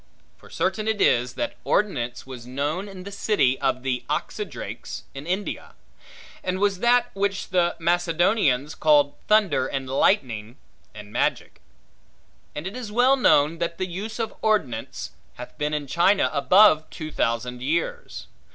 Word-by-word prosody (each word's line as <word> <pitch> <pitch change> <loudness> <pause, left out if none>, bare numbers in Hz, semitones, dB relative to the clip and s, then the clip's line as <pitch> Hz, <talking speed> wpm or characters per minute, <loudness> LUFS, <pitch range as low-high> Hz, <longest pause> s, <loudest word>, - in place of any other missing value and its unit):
For - - -18
certain 215 0 -1
it 220 -2 0
is, 125 -7 +2
that 295 - -3
ordnance 125 - -1
was 125 -2 -9
known 145 +10 -3
in 190 -2 -9
the 200 - -8
city 195 - +1
of 130 -2 0
the 130 -2 -1
Oxidrakes - - -5
in 140 +3 -8
India; 190 +3 -4 0.7
and 185 0 -1
was 200 -1 +1
that, 240 +2 +3
which 200 0 -2
the 175 -2 +2
Macedonians 170 - +1
called 145 -2 +3
thunder 205 -11 +3
and 135 -1 -4
lightning, 120 -3 0 0.4
and 105 -1 -11
magic. - - -1 0.9
And 150 - -5
it 190 +4 -5
is 240 -4 -6
well 250 +4 +4
known 165 - +3
that 170 0 -2
the 185 - -1
use 200 +5 -6
of 225 -2 -3
ordnance, 150 - -1 0.2
hath 125 - -10
been 150 0 -1
in 150 -1 -2
China 175 +8 +2
above 155 +1 +5
two 155 -2 -7
thousand 125 0 -2
years. 140 - -3
165 Hz, 150 wpm, -24 LUFS, 130-200 Hz, 0.9 s, above